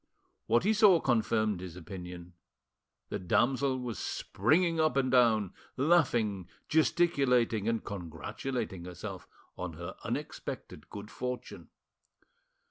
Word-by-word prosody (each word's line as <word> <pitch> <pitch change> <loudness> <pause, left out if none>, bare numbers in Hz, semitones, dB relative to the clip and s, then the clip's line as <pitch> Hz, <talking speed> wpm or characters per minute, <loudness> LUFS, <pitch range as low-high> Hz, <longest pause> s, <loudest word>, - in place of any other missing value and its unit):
What 115 +2 +3
he 215 +3 +3
saw 205 -5 +6
confirmed 110 - +1
his 90 -2 -7
opinion. 90 0 -8 0.8
The - - -3
damsel 125 +8 +2
was 125 -3 -4
springing 165 - +1
up 155 -4 +2
and 130 -2 +2
down, 110 -6 +4 0.2
laughing, 120 - +2 0.2
gesticulating, 135 - +2
and 115 -1 0
congratulating 100 +2 -5
herself 90 +2 -7 0.3
on 90 -2 -5
her 85 +2 -7
unexpected - - -5
good 105 +1 -8
fortune. 125 0 -5
115 Hz, 110 wpm, -31 LUFS, 95-135 Hz, 0.8 s, saw